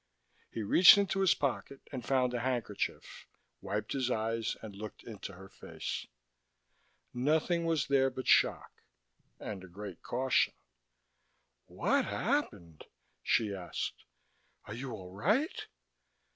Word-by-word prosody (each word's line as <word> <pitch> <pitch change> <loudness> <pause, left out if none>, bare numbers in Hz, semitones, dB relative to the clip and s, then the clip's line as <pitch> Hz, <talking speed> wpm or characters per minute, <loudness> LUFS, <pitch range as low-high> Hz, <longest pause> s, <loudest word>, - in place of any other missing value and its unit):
He 110 - -4
reached 180 - +8
into 195 -1 +1
his 190 -2 +4
pocket 135 0 -3
and 130 -3 -5
found 125 -1 +1
a 120 - -1
handkerchief, 120 -4 -3 0.3
wiped 105 +2 -3
his 130 -2 0
eyes 115 -1 -1
and 105 -3 -8
looked 105 +1 -8
into 105 -3 -8
her 95 +2 -12
face. - - -6 1.1
Nothing 155 +6 +1
was 165 -4 +1
there 135 -1 +3
but 130 0 -6
shock, - - +3 0.6
and 100 -3 -6
a - - -10
great 95 0 -9
caution. 130 +2 +1 1.1
"What - - +1
happened?" 85 -3 -2 0.4
she 105 - +1
asked. 90 -3 -5 0.6
"Are - - -7
you 130 +3 -5
all 95 -5 -8
right?" 210 - 0
120 Hz, 125 wpm, -32 LUFS, 100-135 Hz, 1.1 s, reached